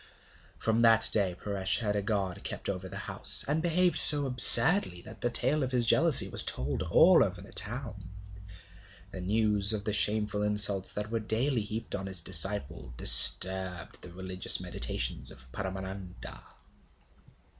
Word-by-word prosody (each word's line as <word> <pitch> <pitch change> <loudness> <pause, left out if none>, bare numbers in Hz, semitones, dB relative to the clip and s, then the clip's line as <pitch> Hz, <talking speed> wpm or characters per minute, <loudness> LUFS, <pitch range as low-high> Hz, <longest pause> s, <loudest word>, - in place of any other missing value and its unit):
From 115 +1 -5
that 115 -1 +3
day 95 -4 -4
Paresh 100 -2 -6
had 105 -3 -5
a 100 - -5
guard 100 -3 -8
kept - - -7
over 95 -1 -10
the 100 - -10
house, 70 +3 +1
and 150 +3 -5
behaved 175 -1 -1
so 145 -1 +7
absurdly 125 - +5
that 110 +2 -17
the 120 - -5
tale 150 +5 -3
of 130 -1 -7
his 125 -2 -3
jealousy 160 +5 +1
was - - 0
told 65 +1 -6
all - - 0
over - - -9
the - - -15
town. 110 -3 -4 1.0
The 95 - -12
news 105 +1 -5
of 105 -2 -9
the 105 - -7
shameful 105 0 -4
insults 105 -2 0
that 105 +1 -9
were 115 - -6
daily 115 +4 -5
heaped 110 +2 -10
on 95 0 -9
his 95 -4 -1
disciple 85 -9 +1
disturbed 95 +4 +5
the 90 - -15
religious 95 +1 -1
meditations - - -5
of 65 - -14
Paramananda. 95 +1 -12
105 Hz, 155 wpm, -24 LUFS, 95-115 Hz, 1.0 s, so